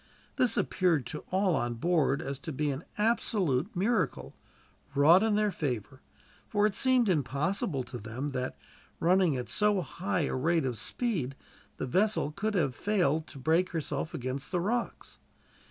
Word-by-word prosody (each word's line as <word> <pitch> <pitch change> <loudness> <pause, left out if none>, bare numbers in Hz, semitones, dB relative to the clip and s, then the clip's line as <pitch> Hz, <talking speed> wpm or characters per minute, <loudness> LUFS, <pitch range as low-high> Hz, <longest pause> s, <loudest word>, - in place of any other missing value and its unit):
This 250 - +3
appeared 170 -8 +1
to - - -5
all 190 -2 +2
on 120 -2 -1
board 145 0 +1
to 160 - -5
be 150 +1 -1
an 135 +4 -6
absolute 210 - +1
miracle, 175 - 0 0.6
wrought 160 +6 +7
in 220 -1 +2
their 210 -1 +2
favor; 130 - -4 0.5
for 205 -1 +2
it 210 - +2
seemed 255 +1 +3
impossible 150 -1 0
to 120 0 -8
them 115 +7 -4
that, 130 -2 -3 0.4
running 175 -4 +3
at 125 - -4
so 210 -2 +2
high 185 +2 -2
a 145 - -1
rate 160 +4 +1
of 125 -4 -2
speed, 170 - -2 0.4
the - - -2
vessel 190 - +1
could 210 +6 -2
have 145 -8 +1
failed 170 -7 +1
to - - -11
break 160 +7 +1
herself 150 -1 -3
against 130 +3 -4
the 180 - +1
rocks. 230 +7 -3
165 Hz, 155 wpm, -30 LUFS, 135-200 Hz, 0.6 s, wrought